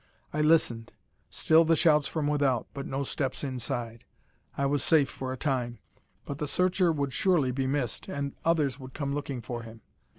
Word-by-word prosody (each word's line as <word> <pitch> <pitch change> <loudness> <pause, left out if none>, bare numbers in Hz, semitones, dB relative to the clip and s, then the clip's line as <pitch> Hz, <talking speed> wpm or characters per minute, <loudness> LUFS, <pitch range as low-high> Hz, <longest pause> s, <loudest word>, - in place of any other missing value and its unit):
I 150 - 0
listened. 150 -8 +2 0.4
Still 160 +1 +4
the 165 0 +3
shouts 150 -2 +4
from 155 -3 -2
without, 140 -5 +1
but 140 -1 -5
no 135 +1 -2
steps 135 0 -3
inside. 120 -3 -4 0.5
I 140 - +1
was 140 +1 +1
safe 155 -4 +4
for 130 -1 -5
a 130 - -4
time. 125 -4 -1 0.5
But 140 0 -6
the 150 - -2
searcher 180 +2 +2
would 140 -4 -2
surely 170 -9 +2
be 130 +1 -1
missed, 135 -3 -2
and 140 -1 -3
others 150 -5 +1
would 130 -1 -10
come 140 -2 -2
looking 140 -3 -4
for 120 0 -5
him. 115 0 -12
140 Hz, 185 wpm, -28 LUFS, 130-150 Hz, 0.5 s, Still